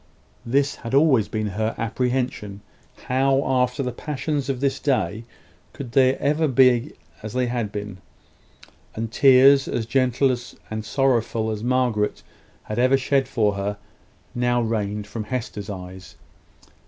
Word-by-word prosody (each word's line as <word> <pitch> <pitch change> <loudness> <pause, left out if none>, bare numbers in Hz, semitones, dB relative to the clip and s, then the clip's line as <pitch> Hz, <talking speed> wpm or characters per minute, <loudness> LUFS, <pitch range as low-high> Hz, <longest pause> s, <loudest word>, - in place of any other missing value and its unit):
This 140 +3 +1
had 115 +2 -4
always 140 -7 +4
been 110 -1 -3
her 110 +3 -2
apprehension. 120 -4 -2 0.4
How, 135 +2 +2
after 130 +1 +1
the 125 - -2
passions 145 +1 -3
of 130 -2 -1
this 135 0 0
day, 110 - -1 0.5
could 130 -4 -8
they 130 +1 +4
ever 150 +4 +1
again 135 -5 -2 0.3
be - - -17 0.3
as 110 0 -7
they 125 0 +1
had 120 -4 -2
been? 105 -2 -6 1.0
And 115 0 -4
tears, 135 +2 +6
as 115 - -2
gentle 130 +1 +2 0.4
and 110 0 -3
sorrowful 115 -2 0
as 110 0 -5
Margaret 120 -4 0 0.4
had 105 +2 -4
ever 130 +2 +4
shed 135 0 +1
for 110 -5 +1
her, 100 +1 -3 0.6
now 120 0 +1
rained 105 -3 -2
from 110 +1 -6
Hester's 110 -4 -5
eyes. 95 -1 -9
120 Hz, 140 wpm, -23 LUFS, 110-135 Hz, 1.0 s, tears